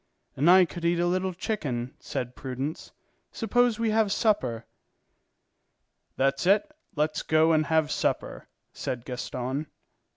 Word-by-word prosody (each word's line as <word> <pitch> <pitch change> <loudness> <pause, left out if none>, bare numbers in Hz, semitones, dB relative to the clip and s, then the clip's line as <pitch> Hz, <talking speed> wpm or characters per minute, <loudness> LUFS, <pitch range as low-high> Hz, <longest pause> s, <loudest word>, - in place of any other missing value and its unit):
"And 150 +6 +3
I 185 0 +8
could 170 +1 -9
eat 170 +1 +2
a 175 - +2
little 185 +2 0
chicken," 145 - -3
said 125 0 -5
Prudence. 135 +3 -5 0.4
"Suppose 240 +1 +1
we 230 -1 0
have 215 -2 +2
supper?" 195 - +1 1.5
"That's 135 +5 +1
it, 215 +11 +3 0.2
let's 150 +1 0
go 160 +1 +3
and 155 -2 +2
have 160 -1 +2
supper," - - -2 0.3
said 125 -1 -4
Gaston. 130 +3 -4
160 Hz, 130 wpm, -27 LUFS, 135-190 Hz, 1.5 s, I